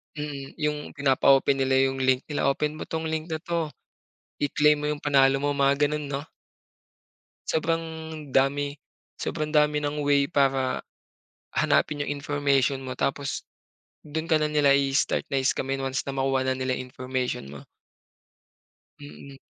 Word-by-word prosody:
Mm, 145 -2 -6
yung 150 0 0
pinapa-open 135 -1 +3
nila 135 0 +3
yung 135 - -3
link 130 0 +2
nila 145 -2 +1
open 150 +2 -2
mo 155 - -5
tong 160 0 -3
link 160 +1 -3
na 160 - -2
to. 165 -3 -2 0.7
I-claim 150 +1 +3
mo 150 - -4
yung 150 -1 -2
panalo 135 -1 +4
mo 145 - +1
mga 140 0 +3
ganon 150 0 -3
no? 140 0 -3 1.3
Sobrang 165 +1 +1 0.5
dami 140 +2 +1 0.4
sobrang 155 -2 -2
dami 150 0 +4
ng 145 0 -2
way 140 -1 +4
para 135 -4 +1 0.7
hanapin 145 -1 +2
yung - - -5
information 140 -2 +1
mo 130 -1 -5
tapos 140 0 -2 0.6
dun 160 +2 -4
ka 160 - +4
na 150 - +1
nila 150 -2 +4
i-start 135 0 +1
na-scamin 135 0 0
once 135 0 -2
na 140 - -4
makuha 135 0 +1
na 130 0 +1
nila 130 -1 -1
information 130 - -4
mo. 70 - -9 1.4
Mm. 140 -1 -11
140 Hz, 145 wpm, -26 LUFS, 135-150 Hz, 1.4 s, panalo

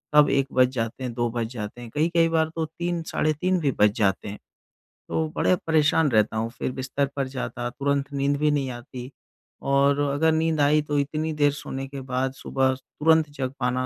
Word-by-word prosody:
तब 150 -1 +7
1 135 -1 +2
बज 130 0 +5
जाते 115 +1 -3
हैं, 125 -2 -3
2 120 0 0
बज 115 -1 -2
जाते 110 +1 -6
हैं, 120 - -8
कई-कई 165 +2 +3
बार 160 -1 +2
तो 165 -1 -1
3, 170 +2 -3
साढ़े 155 -1 0
3 180 +4 0
भी 145 -4 +1
बज 105 0 +6
जाते 100 -2 +1
हैं 105 - -8 0.7
तो 160 -1 0
बड़े 185 - +3
परेशान 155 0 +3
रहता 110 -1 +2
हूँ 115 +1 -1
फिर - - -2
बिस्तर 135 +2 -1
पर 135 -2 -1
जाता 125 -2 -4
तुरंत 140 +2 -1
नींद 140 +1 +1
भी 150 0 +3
नहीं 140 -3 0
आती। 125 +1 -8 0.5
और 140 +1 +3
अगर 155 +3 +2
नींद 160 -1 +1
आई 150 +2 +4
तो 145 0 -2
इतनी 155 +3 -1
देर 145 -1 +3
सोने 140 -2 -6
के 140 0 -7
बाद 130 0 -2
सुबह 135 0 0
स - - -14 0.2
तुरंत 160 0 +4
जग 135 -3 -4
पाना, 125 0 0
140 Hz, 210 wpm, -25 LUFS, 125-155 Hz, 0.7 s, तब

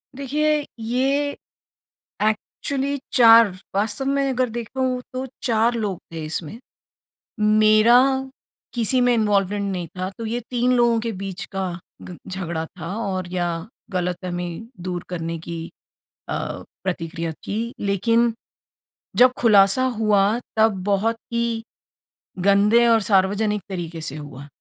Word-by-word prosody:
देखिए 295 +2 0
ये 265 +5 +1 0.9
एक्चुअली 270 +6 -1 0.2
4 230 -3 +8 0.2
वास्तव 210 +5 -1
में 275 0 +1
अगर 255 -1 0
देखूँ 250 +3 -2
तो 255 +1 -3 0.2
4 230 0 +2
लोग 210 -6 -2
थे 160 -1 -5
इसमें। 155 +5 -5 0.8
मेरा 215 +2 +6 0.8
किसी 240 +2 +2
में 245 0 +4
इन्वॉल्वमेंट 205 -2 +1
नहीं 180 -2 -3
था 185 0 -2
तो 230 - -4
ये 235 +2 -2
3 250 0 +2
लोगों 235 -1 +4
के 230 0 -3
बीच 195 -1 -5
का 190 -1 -2 0.3
ग 180 - -9
झगड़ा 170 -4 -3
था 170 +3 -5
और 190 -5 -3
या 175 -1 0 0.4
गलतफहमी 180 -1 -2 0.3
दूर 180 -1 -4
करने 165 -2 -4
की 165 0 -6 0.6
अ, - - -2 0.5
प्रतिक्रिया 165 -2 -3
थी। 225 +8 -4
लेकिन 230 +4 +2 0.9
जब 250 0 +7
खुलासा 210 +1 +5
हुआ 210 -2 +3 0.3
तब 220 -4 +3
बहुत 205 +3 +1 0.2
ही 235 -1 -1 0.8
गंदे 200 +5 +4
और 225 -1 +5
सार्वजनिक 205 +1 +2
तरीके 170 -3 -5
से 155 -2 -5
हुआ। 145 -2 -9
210 Hz, 125 wpm, -22 LUFS, 185-235 Hz, 0.9 s, 4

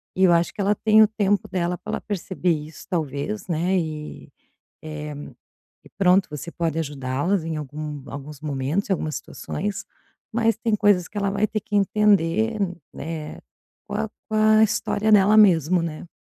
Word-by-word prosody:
e 190 - +2
eu 175 - +6
acho 170 0 +2
que - - -19
ela 200 +1 +3
tem 215 +1 +5
o - - +5
tempo 205 -2 0
dela 180 -1 -1
para - - -7
ela - - -2
perceber 185 -2 -3
isso, 155 0 -5
talvez, 170 +4 -3
né. 175 +3 +1
E, 155 -3 -5 0.5
eh, 150 -1 -6 0.7
e - - -15
pronto, 190 0 +4
você 150 +3 -6
pode 165 -2 -2
ajudá-las 145 +5 -1
em 165 -1 -3
algum 150 0 -6
alguns 145 +1 -8
momentos, 150 +7 -2
em - - +4
algumas 155 -4 -2
situações, 205 0 -5 0.5
mas 225 0 +2
tem 230 -2 0
coisas 205 -4 +3
que 210 - -16
ela 200 -1 0
vai 200 +2 +1
ter 215 - -3
que 210 0 -3
entender, 210 +1 +2 0.3
né, 155 -1 -6 0.5
com - - -6
a 220 +1 -1 0.2
com 220 - -4
a 215 0 +5
história 215 0 0
dela 210 +1 +6
mesmo, 180 -4 +5
né. 165 +1 -6
180 Hz, 175 wpm, -23 LUFS, 155-205 Hz, 0.7 s, eu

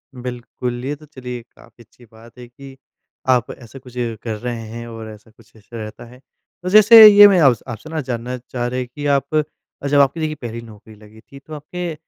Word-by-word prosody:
बिल्कुल, 125 0 -6
ये 145 +2 -3
तो 155 +1 -17
चलिए 125 -4 -8
काफ़ी 120 - -19
अच्छी 120 +2 -22
बात 115 +2 -18
है 125 -1 -11
कि 135 +2 -14 0.5
आप 125 -2 +2
ऐसा 120 +2 -13
कुछ 125 -1 -16 0.3
कर 110 -2 -4
रहे 120 +1 -5
हैं 115 +1 -8
और 115 -1 -9
ऐसा 110 +1 -15
कुछ 115 0 -24
इश 110 -2 -22
रहता 110 +1 -8
है। 125 +2 -16 0.4
तो 180 - -3
जैसे 215 +2 +9
ये 205 0 +9
मैं 195 -3 +3
आपसे 130 -8 +3
आपसे 155 +8 -6
जानना 125 0 -5
चाह 120 0 -6
रहे 125 +1 -3
हैं 125 - -4
कि 145 - -6
आप 140 +3 -5
अ, 150 -2 -5
जब 145 0 +3
आपकी 140 +3 +2
देखिए 155 -1 -2
पहली 115 -1 -6
नौकरी 110 -1 -15
लगी 105 +1 -18
थी 140 - -12
तो 155 +3 -13
आपके 170 +3 -6
125 Hz, 215 wpm, -19 LUFS, 115-145 Hz, 0.5 s, जैसे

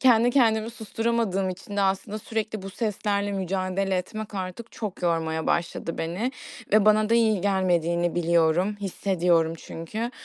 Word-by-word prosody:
kendi 245 -2 +5
kendimi 225 -3 +3
susturamadığım 225 -4 -1
için 195 +2 -8
de - - +2
aslında 195 +2 0
sürekli 215 -2 -3
bu 195 - -6
seslerle 205 -1 -1
mücadele 190 0 -1
etmek 210 +3 -5
artık 190 +5 -5
çok 205 -5 -6
yormaya 160 -2 0
başladı 170 -1 -1
beni. 185 +11 -2 0.4
Ve 215 -1 +6
bana 215 0 +4
da - - +5
iyi 220 -4 +3
gelmediğini 175 -3 +1
biliyorum, 170 +3 +2
hissediyorum 175 -4 +1
çünkü. 215 +12 -5
195 Hz, 140 wpm, -26 LUFS, 175-215 Hz, 0.4 s, Ve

